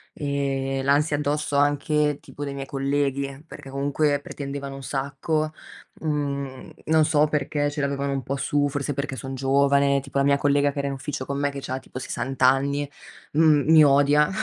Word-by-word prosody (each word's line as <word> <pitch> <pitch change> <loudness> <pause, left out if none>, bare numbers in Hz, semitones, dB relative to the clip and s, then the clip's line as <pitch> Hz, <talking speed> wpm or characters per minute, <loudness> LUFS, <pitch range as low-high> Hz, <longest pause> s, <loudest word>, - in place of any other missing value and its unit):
E 135 -2 -1
l'ansia 145 +2 +2
addosso 145 0 -1
anche 145 +1 +2
tipo 145 - -9
dei 140 -1 -4
miei 135 0 -5
colleghi, 140 0 -1
perché 135 - -11
comunque 145 +2 0
pretendevano 140 -1 -6
un 135 - -9
sacco. 145 +3 -2 0.5
Mhmm, 140 -3 -3 0.2
non 160 -1 +4
so 150 0 +3
perché 145 0 -1
ce 150 - -5
l'avevano 140 0 -1
un 135 -1 -1
po' 140 - -3
su, 145 +1 +1
forse 145 +1 -2
perché 140 0 -3
son 135 +2 -6
giovane, 140 +1 +3
tipo 140 0 -6
la 140 - +3
mia 140 0 +4
collega 145 0 +2
che 145 - -4
era 140 - -1
in 140 - -2
ufficio 135 0 -5
con 140 +1 -3
me 145 0 0
che 140 -1 -7
c'ha 130 0 -4
tipo 130 - -9
60 130 -1 +1
anni, 140 +2 0 0.4
uhm, 155 -1 +4
mi 160 - +8
odia. 145 +2 +4
140 Hz, 185 wpm, -24 LUFS, 135-145 Hz, 0.5 s, mi